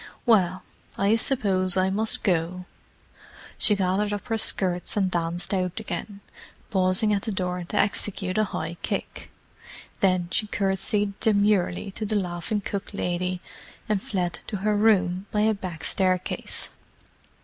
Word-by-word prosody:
"Well, 190 Hz, -6 st, +3 dB, 0.3 s
I 200 Hz, +3 st, +3 dB
suppose 195 Hz, -7 st, +2 dB
I 185 Hz, 0 st, +2 dB
must 215 Hz, +3 st, +2 dB
go." 180 Hz, -1 st, 0 dB, 0.9 s
She 210 Hz, -, +4 dB
gathered 195 Hz, +2 st, 0 dB
up 205 Hz, +3 st, -5 dB
her 225 Hz, -, +1 dB
skirts 180 Hz, -1 st, +1 dB
and 190 Hz, -2 st, +2 dB
danced 175 Hz, +2 st, -1 dB
out 185 Hz, 0 st, -1 dB
again, 200 Hz, 0 st, -6 dB, 0.5 s
pausing 190 Hz, +2 st, +3 dB
at 200 Hz, -, +1 dB
the 220 Hz, -, -3 dB
door 180 Hz, -2 st, -2 dB
to 175 Hz, -, -5 dB
execute 200 Hz, -1 st, +1 dB
a 215 Hz, -, +3 dB
high -, -, -5 dB
kick. -, -, -4 dB, 0.7 s
Then 185 Hz, -2 st, +2 dB
she 215 Hz, -, +1 dB
curtsied 200 Hz, +1 st, 0 dB
demurely 200 Hz, -3 st, +2 dB
to 215 Hz, +3 st, -5 dB
the 215 Hz, -, -1 dB
laughing 180 Hz, +2 st, -2 dB
cook 200 Hz, +1 st, -5 dB
lady, 180 Hz, 0 st, -2 dB, 0.5 s
and 210 Hz, -3 st, 0 dB
fled 180 Hz, -4 st, -2 dB
to 205 Hz, -, -3 dB
her 210 Hz, 0 st, +3 dB
room 195 Hz, -3 st, +2 dB
by 210 Hz, -, +1 dB
a 220 Hz, +1 st, +3 dB
back 185 Hz, -5 st, -7 dB
staircase. 185 Hz, -1 st, 0 dB
195 Hz, 145 wpm, -25 LUFS, 180-210 Hz, 0.9 s, She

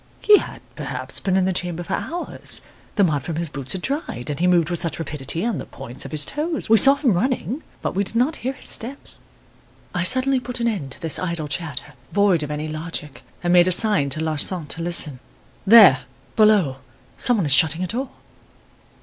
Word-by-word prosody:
"'He 420 Hz, -1 st, +6 dB
had, -, -, -9 dB
perhaps, -, -, -6 dB
been 190 Hz, -1 st, 0 dB
in 185 Hz, -, +2 dB
the 190 Hz, -, 0 dB
chamber 175 Hz, -1 st, -3 dB
for -, -, -5 dB
hours. 345 Hz, +2 st, -2 dB, 0.3 s
The 205 Hz, -, +3 dB
mud 150 Hz, -6 st, +1 dB
from 160 Hz, +4 st, -5 dB
his 165 Hz, 0 st, -2 dB
boots 140 Hz, -2 st, -5 dB
had 185 Hz, -, -6 dB
dried, 270 Hz, -, -3 dB
and 145 Hz, -, -5 dB
he 180 Hz, -, +2 dB
moved 175 Hz, -2 st, +3 dB
with 175 Hz, -, -1 dB
such 165 Hz, -, -1 dB
rapidity 155 Hz, -, -3 dB
on 235 Hz, -6 st, -1 dB
the -, -, -7 dB
points 130 Hz, -1 st, -9 dB
of -, -, -8 dB
his 150 Hz, -2 st, +1 dB
toes 310 Hz, -4 st, -3 dB
We 225 Hz, -, +8 dB
saw 275 Hz, +7 st, +6 dB
him 280 Hz, -6 st, +1 dB
running, 250 Hz, -, -1 dB, 0.2 s
but -, -, -2 dB
we 200 Hz, -, 0 dB
did 200 Hz, -, -5 dB
not 255 Hz, +7 st, +1 dB
hear 260 Hz, +3 st, -3 dB
his -, -, -11 dB
steps.' 255 Hz, +5 st, -3 dB, 0.7 s
"I 175 Hz, -, -1 dB
suddenly 260 Hz, +8 st, +2 dB
put 250 Hz, 0 st, -6 dB
an 235 Hz, -, 0 dB
end 195 Hz, -12 st, -2 dB
to -, -, -11 dB
this 165 Hz, -2 st, +1 dB
idle 170 Hz, -4 st, -3 dB
chatter 145 Hz, 0 st, -6 dB, 0.2 s
void 200 Hz, -5 st, +3 dB
of 150 Hz, -, -4 dB
any 150 Hz, +1 st, -4 dB
logic, 155 Hz, -2 st, -6 dB, 0.2 s
and 175 Hz, 0 st, +2 dB
made 175 Hz, 0 st, +6 dB
a -, -, +2 dB
sign 200 Hz, -7 st, +3 dB
to 155 Hz, +3 st, -1 dB
Larsan 160 Hz, +2 st, -1 dB
to 165 Hz, -, -2 dB
listen. 165 Hz, -6 st, 0 dB, 0.5 s
"'There 200 Hz, -, +9 dB, 0.4 s
below; 210 Hz, -11 st, +4 dB, 0.4 s
some 245 Hz, -2 st, +4 dB
one 190 Hz, -, 0 dB
is 145 Hz, -, +2 dB
shutting 160 Hz, +5 st, +4 dB
a -, -, -2 dB
door. 250 Hz, +7 st, -3 dB
175 Hz, 215 wpm, -22 LUFS, 155-230 Hz, 0.7 s, There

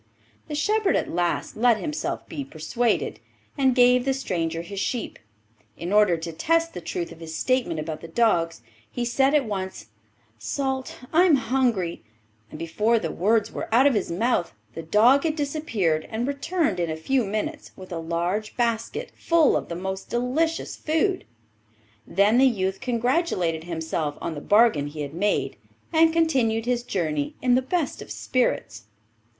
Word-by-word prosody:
The 300 Hz, -, -4 dB
shepherd 415 Hz, +6 st, +2 dB
at -, -, -1 dB
last 175 Hz, 0 st, -1 dB
let 235 Hz, 0 st, +4 dB
himself 305 Hz, +5 st, -4 dB
be 285 Hz, -, -5 dB
persuaded, 235 Hz, -, -1 dB, 0.4 s
and 265 Hz, -3 st, +2 dB
gave 250 Hz, 0 st, +5 dB
the 270 Hz, 0 st, 0 dB
stranger 165 Hz, -9 st, -2 dB
his 195 Hz, +3 st, -6 dB
sheep. 240 Hz, +3 st, -3 dB, 0.6 s
In 175 Hz, +4 st, -4 dB
order 210 Hz, -5 st, +5 dB
to 165 Hz, +1 st, -5 dB
test 330 Hz, -, +1 dB
the 180 Hz, -, -6 dB
truth 170 Hz, +1 st, -4 dB
of -, -, -12 dB
his 160 Hz, -1 st, -7 dB
statement 255 Hz, -11 st, 0 dB
about 155 Hz, 0 st, -5 dB
the 165 Hz, -, -8 dB
dogs, 165 Hz, -, +1 dB, 0.3 s
he 245 Hz, -, -3 dB
said 270 Hz, +4 st, +2 dB
at 285 Hz, -3 st, +3 dB
once, 190 Hz, -, -5 dB, 0.5 s
'Salt, 265 Hz, -, -3 dB, 0.2 s
I 345 Hz, +3 st, +6 dB
am 335 Hz, -5 st, +6 dB
hungry,' 240 Hz, -9 st, 0 dB, 0.5 s
and -, -, -9 dB
before 210 Hz, +8 st, +1 dB
the 165 Hz, -7 st, -2 dB
words 215 Hz, +4 st, +1 dB
were -, -, -5 dB
out 245 Hz, +4 st, +5 dB
of 285 Hz, -, +5 dB
his 205 Hz, -4 st, -1 dB
mouth 180 Hz, -, 0 dB, 0.2 s
the 165 Hz, -, -6 dB
dog 225 Hz, -, +4 dB
had 315 Hz, -2 st, 0 dB
disappeared, 275 Hz, -, -1 dB
and 230 Hz, +3 st, -2 dB
returned 285 Hz, -, -1 dB
in 170 Hz, -1 st, 0 dB
a 160 Hz, -, -2 dB
few 255 Hz, +10 st, +1 dB
minutes 215 Hz, +1 st, -3 dB
with 185 Hz, -1 st, -11 dB
a 170 Hz, -, -3 dB
large 175 Hz, +6 st, -2 dB
basket 235 Hz, -, -1 dB
full 335 Hz, -4 st, +3 dB
of -, -, -2 dB
the 170 Hz, -, -4 dB
most 190 Hz, +2 st, -5 dB
delicious 280 Hz, +8 st, -1 dB
food. 360 Hz, +5 st, 0 dB, 0.8 s
Then 210 Hz, +5 st, +3 dB
the 265 Hz, -, +6 dB
youth 190 Hz, -5 st, -1 dB
congratulated 235 Hz, -, 0 dB
himself 160 Hz, -3 st, -3 dB
on 165 Hz, -, -4 dB
the 145 Hz, -, -6 dB
bargain 205 Hz, -9 st, +4 dB
he 150 Hz, +1 st, -7 dB
had 145 Hz, 0 st, -5 dB
made, 205 Hz, +5 st, 0 dB, 0.4 s
and 325 Hz, 0 st, +5 dB
continued 260 Hz, -9 st, +1 dB
his 245 Hz, 0 st, 0 dB
journey 155 Hz, -10 st, -2 dB
in 250 Hz, -1 st, +2 dB
the 255 Hz, -, +4 dB
best 310 Hz, +3 st, -2 dB
of -, -, -10 dB
spirits. 120 Hz, -, -1 dB
225 Hz, 170 wpm, -25 LUFS, 170-270 Hz, 0.8 s, I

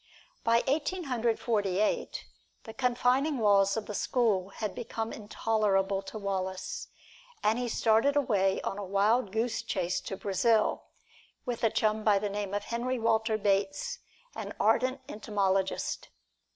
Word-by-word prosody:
By 230 Hz, +1 st, +3 dB
Eighteen 315 Hz, +6 st, 0 dB
Hundred 240 Hz, -5 st, 0 dB
Forty 205 Hz, -5 st, 0 dB
eight, 215 Hz, -, -1 dB, 0.4 s
the 225 Hz, -, -9 dB
confining 250 Hz, +4 st, +1 dB
walls 200 Hz, -2 st, +4 dB
of 220 Hz, -, -3 dB
the 210 Hz, -, -6 dB
school 205 Hz, -5 st, +1 dB
had 205 Hz, 0 st, -4 dB
become 225 Hz, +2 st, -4 dB
intolerable 205 Hz, -2 st, 0 dB
to 195 Hz, -, -8 dB
Wallace, 190 Hz, -2 st, -3 dB, 0.6 s
and 220 Hz, +3 st, +2 dB
he 245 Hz, -, -1 dB
started 230 Hz, +6 st, +3 dB
away 200 Hz, -9 st, +2 dB
on 195 Hz, -, -3 dB
a -, -, -4 dB
wild 200 Hz, +3 st, +2 dB
goose 225 Hz, +2 st, -1 dB
chase 185 Hz, -5 st, -1 dB
to 195 Hz, -, -6 dB
Brazil, 210 Hz, +3 st, +1 dB, 0.6 s
with 245 Hz, -2 st, -3 dB
a 225 Hz, -, +5 dB
chum 215 Hz, 0 st, +1 dB
by 210 Hz, -2 st, +4 dB
the 205 Hz, +1 st, -1 dB
name 200 Hz, 0 st, -3 dB
of 205 Hz, -, -2 dB
Henry 245 Hz, +3 st, -2 dB
Walter 225 Hz, -1 st, +1 dB
Bates, 205 Hz, -, 0 dB, 0.3 s
an -, -, -6 dB
ardent 255 Hz, +1 st, +2 dB
entomologist. 195 Hz, -3 st, -1 dB
215 Hz, 145 wpm, -30 LUFS, 200-240 Hz, 0.6 s, a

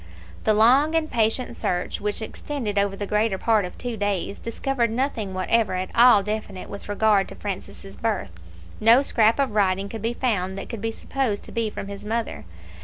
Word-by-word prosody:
The 215 Hz, -, +4 dB
long 265 Hz, +9 st, +5 dB
and 315 Hz, -1 st, 0 dB
patient 230 Hz, +2 st, 0 dB
search 180 Hz, -4 st, -2 dB
which 210 Hz, +2 st, -1 dB
extended 220 Hz, -4 st, -3 dB
over 200 Hz, -1 st, 0 dB
the 205 Hz, -, -4 dB
greater 210 Hz, 0 st, +1 dB
part 215 Hz, -1 st, +2 dB
of 180 Hz, -, -9 dB
two 245 Hz, -2 st, -4 dB
days 200 Hz, -1 st, -2 dB
discovered 235 Hz, +1 st, -1 dB
nothing 225 Hz, -5 st, -2 dB
whatever 200 Hz, +2 st, +1 dB
at 185 Hz, +1 st, -3 dB
all 235 Hz, -4 st, +7 dB
definite 210 Hz, -2 st, -5 dB
with 200 Hz, 0 st, -8 dB
regard 205 Hz, -1 st, +3 dB
to -, -, -10 dB
Francis' 195 Hz, 0 st, -7 dB
birth. 220 Hz, -, -2 dB, 0.5 s
No 230 Hz, +5 st, +6 dB
scrap 225 Hz, -4 st, +3 dB
of 275 Hz, -4 st, +1 dB
writing 195 Hz, -1 st, +1 dB
could 225 Hz, 0 st, -6 dB
be 230 Hz, +2 st, -1 dB
found 195 Hz, -7 st, -1 dB
that -, -, -6 dB
could 230 Hz, -4 st, -6 dB
be 225 Hz, 0 st, -1 dB
supposed 230 Hz, -3 st, -2 dB
to -, -, -11 dB
be 230 Hz, -2 st, -1 dB
from 200 Hz, -, -7 dB
his 200 Hz, 0 st, -8 dB
mother. 225 Hz, -, -3 dB
215 Hz, 190 wpm, -24 LUFS, 200-230 Hz, 0.5 s, all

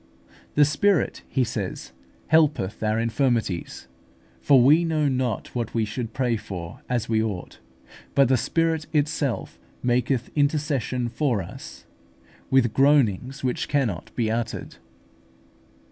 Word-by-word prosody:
"The 145 Hz, -, +6 dB
Spirit," 165 Hz, +4 st, +1 dB
he 130 Hz, -, +1 dB
says, 105 Hz, -5 st, -4 dB, 0.4 s
"helpeth 150 Hz, -11 st, +2 dB
our 110 Hz, 0 st, +1 dB
infirmities; 115 Hz, -6 st, -1 dB, 0.5 s
for 140 Hz, -2 st, +5 dB
we 150 Hz, +7 st, +6 dB
know 155 Hz, -3 st, +1 dB
not 130 Hz, -3 st, -2 dB
what 120 Hz, -2 st, -3 dB
we 115 Hz, -1 st, +2 dB
should 115 Hz, +2 st, -5 dB
pray 125 Hz, -2 st, 0 dB
for 90 Hz, -5 st, -7 dB
as 120 Hz, -3 st, -1 dB
we 110 Hz, -1 st, +2 dB
ought; 105 Hz, -5 st, -4 dB, 0.6 s
but 140 Hz, -2 st, +5 dB
the 130 Hz, -, +4 dB
Spirit 160 Hz, +6 st, 0 dB
itself 145 Hz, -3 st, -1 dB, 0.2 s
maketh 125 Hz, 0 st, 0 dB
intercession 145 Hz, -4 st, 0 dB
for 120 Hz, -5 st, 0 dB
us, -, -, -11 dB, 0.6 s
with 125 Hz, -4 st, +3 dB
groanings 135 Hz, -3 st, +2 dB
which 125 Hz, -1 st, -1 dB
cannot 125 Hz, -, -1 dB
be 110 Hz, -3 st, 0 dB
uttered." 115 Hz, 0 st, -4 dB
125 Hz, 125 wpm, -24 LUFS, 110-145 Hz, 0.6 s, The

